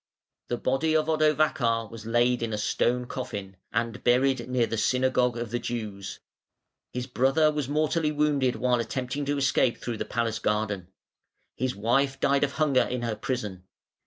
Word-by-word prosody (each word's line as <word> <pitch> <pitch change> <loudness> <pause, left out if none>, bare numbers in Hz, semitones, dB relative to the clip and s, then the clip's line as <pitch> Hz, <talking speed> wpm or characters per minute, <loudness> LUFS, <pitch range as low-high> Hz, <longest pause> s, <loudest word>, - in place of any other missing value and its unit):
The 120 - -1
body 135 +6 +1
of 155 -1 +3
Odovacar 150 -7 +2
was 115 -1 -9
laid 120 +1 +2
in 115 -1 -2
a - - -1
stone 125 +3 +1
coffin, 105 -7 -6 0.2
and 115 +1 -2
buried 125 0 +2
near 125 -2 +2
the 115 - -3
synagogue 125 +1 +2
of 120 -2 -4
the 120 - -1
Jews. 105 -6 -5 0.7
His 125 0 -3
brother 135 +5 +3
was 150 -3 -3
mortally 155 +1 +1
wounded 145 -4 +1
while 125 -1 +1
attempting 125 +5 -3
to 145 +1 0
escape 135 -3 +2
through 120 -2 -4
the - - -3
palace 115 -2 -1
garden. 105 -4 -1 0.7
His 130 +1 -1
wife 135 +6 +1
died 140 0 +2
of 140 -1 0
hunger 140 -4 +3
in 125 -1 -2
her 115 -2 -1
prison. 105 -5 -4
125 Hz, 165 wpm, -27 LUFS, 115-140 Hz, 0.7 s, of